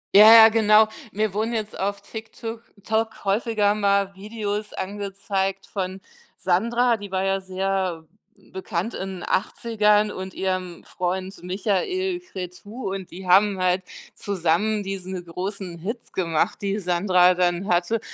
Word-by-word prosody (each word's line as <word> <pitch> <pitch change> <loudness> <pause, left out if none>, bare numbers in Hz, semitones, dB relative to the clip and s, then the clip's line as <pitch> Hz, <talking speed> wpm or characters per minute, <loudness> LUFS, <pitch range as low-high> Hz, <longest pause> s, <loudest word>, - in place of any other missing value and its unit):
Ja, 215 +2 +10
ja, 225 -1 +11
genau. 215 -1 +5 0.2
Mir 215 -1 -1
wurden 220 +3 -1
jetzt 215 -2 -3
auf 200 +1 -2
TikTuk 225 +2 -8 0.2
Tok 220 0 -1
häufiger 210 0 +2
mal 200 -1 +1
Videos 210 +1 -4
angezeigt 195 0 -3
von 190 -1 -4 0.4
Sandra, 235 +6 +2
die 205 -3 -9
war 190 0 0
ja 195 0 0
sehr 190 -3 -2 0.5
bekannt 190 +3 -3
in 190 0 -5
'nen - - -9
80ern, 210 0 +2
und 190 0 -7
ihrem 185 -2 -3
Freund 185 +1 -3
Michael 220 - -1
Cretu. 195 - -7
Und 190 -2 -8
die 185 +1 -9
haben 195 +2 +5
halt 185 +1 +2 0.3
zusammen 200 +3 0
diese 190 -1 -5
großen 180 +1 -6
Hits 225 +7 -6
gemacht, 165 -4 0
die 200 +1 -1
Sandra 180 0 +4
dann 175 +1 0
hatte. 180 +5 +1
195 Hz, 135 wpm, -24 LUFS, 185-215 Hz, 0.5 s, ja